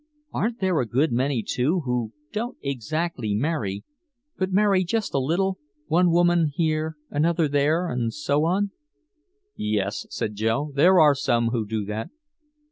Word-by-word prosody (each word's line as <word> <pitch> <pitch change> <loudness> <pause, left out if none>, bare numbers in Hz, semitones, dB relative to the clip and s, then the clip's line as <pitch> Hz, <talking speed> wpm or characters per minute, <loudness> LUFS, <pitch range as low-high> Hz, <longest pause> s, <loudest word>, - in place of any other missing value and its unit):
"Aren't 230 +2 -1
there 185 -4 +2
a 125 - 0
good 135 +6 +1
many, 125 0 0
too, 155 +9 0
who 125 -5 -2 0.2
don't 235 +4 -4
exactly 140 -3 -2
marry 110 -7 -2 0.5
but 190 0 -2
marry 195 -1 +3
just 220 +4 -2
a 140 - +2
little 185 +8 0 0.3
one 175 +2 +3
woman 175 -1 +3
here, 155 -1 0
another 160 +2 +2
there, 145 +5 +1
and 120 -5 -1
so 150 +3 0
on?" 195 +4 +1 0.8
"Yes," 105 -1 -2
said 110 -3 -3
Joe, 115 +8 -1
"there 175 +6 +5
are 150 -2 +7
some 120 -4 +1
who 115 -3 -2
do 110 -1 -2
that." 105 +2 -4
150 Hz, 150 wpm, -24 LUFS, 120-175 Hz, 0.8 s, are